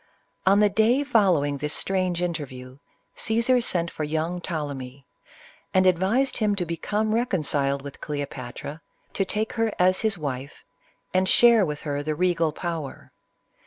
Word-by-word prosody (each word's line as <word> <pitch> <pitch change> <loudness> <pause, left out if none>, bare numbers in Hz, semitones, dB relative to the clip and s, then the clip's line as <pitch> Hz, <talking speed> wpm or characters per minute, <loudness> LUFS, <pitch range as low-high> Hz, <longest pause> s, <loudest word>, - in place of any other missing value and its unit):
On 200 +2 +6
the 210 - +5
day 225 +7 +3
following 175 - +2
this 150 +1 -1
strange 185 -2 -1
interview, 135 -6 -5 0.4
Caesar 235 +3 +2
sent 170 -7 -1
for 155 - -4
young 160 +4 -2
Ptolemy, 140 -6 -5 0.7
and 185 0 +5
advised 195 +9 +2
him 210 -3 +1
to 180 -3 -1
become 210 +6 -1
reconciled 145 - 0
with 140 -1 -9
Cleopatra, 145 0 -6 0.3
to 195 - 0
take 215 +3 -2
her 225 -1 0
as 185 +1 +3
his 215 -3 0
wife, 140 -3 -6 0.5
and 185 0 +2
share 235 -3 +6
with 150 -4 -3
her 145 -2 -2
the 155 +1 -2
regal 170 -2 +1
power. 160 -3 -6
175 Hz, 145 wpm, -25 LUFS, 145-205 Hz, 0.7 s, On